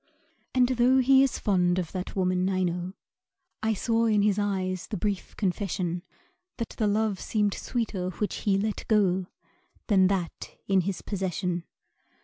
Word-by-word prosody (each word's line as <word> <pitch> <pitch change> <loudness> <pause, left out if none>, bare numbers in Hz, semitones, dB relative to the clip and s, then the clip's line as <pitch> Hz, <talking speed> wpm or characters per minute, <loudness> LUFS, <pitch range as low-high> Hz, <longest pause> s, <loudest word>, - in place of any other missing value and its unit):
And 250 -1 +5
tho' 255 +1 +4
he 265 +1 +6
is 270 -2 +2
fond 180 -4 +2
of 175 -3 -2
that 185 -1 -5
woman, 185 -1 +1
I 185 -1 +1
know 175 +1 -2 0.7
I 220 0 +1
saw 230 +2 +1
in 210 -2 +3
his 210 -1 +2
eyes 185 -3 -1
the 215 - -4
brief 200 0 -3
confession 180 -3 -1 0.6
That 230 - -3
the 215 - -1
love 210 -1 +1
seemed 210 -2 0
sweeter 210 -7 -2
which 205 +3 -3
he 200 -2 +1
let 210 +1 -2
go 190 -4 +2 0.6
Than 190 -3 +5
that 185 -3 -3
in 195 -1 +4
his 185 +1 -3
possession. 180 -3 -2
195 Hz, 155 wpm, -27 LUFS, 185-215 Hz, 0.7 s, he